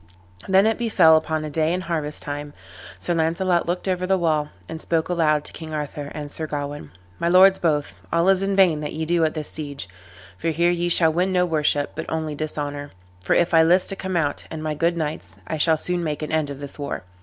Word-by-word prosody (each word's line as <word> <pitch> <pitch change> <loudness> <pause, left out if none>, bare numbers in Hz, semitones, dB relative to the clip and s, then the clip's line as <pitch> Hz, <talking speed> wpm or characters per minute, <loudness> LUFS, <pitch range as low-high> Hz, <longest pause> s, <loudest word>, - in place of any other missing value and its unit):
Then 190 +1 +5
it 225 +1 +1
befell 185 -9 +5
upon 155 0 0
a 150 - -6
day 160 +2 +1
in 180 +1 -1
harvest 155 -4 -3
time, 145 0 -5 0.5
Sir 175 - -1
Launcelot 170 +2 +1
looked 180 +2 -2
over 185 -1 -1
the 190 0 +3
wall, 155 -4 0 0.2
and 160 0 -7
spoke 165 0 0
aloud 155 -4 +2
to - - -11
King 160 -1 -7
Arthur 145 -1 -5
and 145 -1 -6
Sir 155 +1 -4
Gawain, 145 - -5 0.3
"My 170 - 0
lords 190 +2 +6
both, 150 -4 -1
all 170 +2 +2
is 195 -1 +4
in 195 0 0
vain 180 -6 +4
that 150 -1 -5
ye 160 +1 -3
do 170 0 +2
at 155 0 0
this 155 -1 -4
siege, 145 - -5 0.5
for 165 - -1
here 170 +2 +2
ye 175 0 0
shall 165 -2 +5
win 180 +3 +1
no 180 -1 +3
worship, 150 -3 0
but 160 - -6
only 160 -1 -2
dishonor; 145 -1 -4 0.3
for - - +2
if 175 0 +2
I 165 - +7
list 175 +3 +4
to 195 - -2
come 190 -2 -3
out, 145 -3 -1
and 155 -1 -6
my 155 -1 -1
good 170 +3 0
knights, 150 - -3
I 155 - -3
shall 160 +1 +4
soon 175 +2 -1
make 155 -1 -3
an 155 - -4
end 155 -2 0
of 140 -1 -7
this 140 +1 -7
war." 140 -9 -4
160 Hz, 235 wpm, -23 LUFS, 150-175 Hz, 0.5 s, I